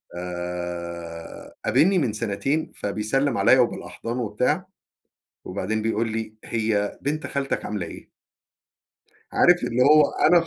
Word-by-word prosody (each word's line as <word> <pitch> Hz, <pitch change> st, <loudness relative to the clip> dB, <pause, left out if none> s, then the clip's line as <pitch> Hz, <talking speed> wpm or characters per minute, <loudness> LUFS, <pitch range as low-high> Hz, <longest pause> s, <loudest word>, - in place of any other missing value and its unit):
آآ، 85 Hz, -1 st, -6 dB
قابِلني 190 Hz, +4 st, +4 dB
من 130 Hz, -11 st, +1 dB
سنتين 120 Hz, +9 st, -1 dB
فبيسلّم 110 Hz, +8 st, 0 dB
عليَّ 130 Hz, -, +6 dB
وبالأحضان 120 Hz, -1 st, -1 dB
وبتاع، 125 Hz, -, 0 dB, 0.8 s
وبعدين 100 Hz, +3 st, -2 dB
بيقول 115 Hz, +1 st, 0 dB
لي: 110 Hz, -1 st, -4 dB
"هي 110 Hz, -3 st, -1 dB
بنت 150 Hz, +2 st, -2 dB
خالتك 140 Hz, -1 st, -2 dB
عاملة 105 Hz, -4 st, -3 dB
إيه؟" -, -, -11 dB, 1.2 s
عارف 175 Hz, 0 st, +5 dB
اللي 125 Hz, +2 st, 0 dB
هو 150 Hz, +1 st, +6 dB, 0.2 s
أنا 170 Hz, +1 st, +6 dB
110 Hz, 115 wpm, -24 LUFS, 100-140 Hz, 1.2 s, عليَّ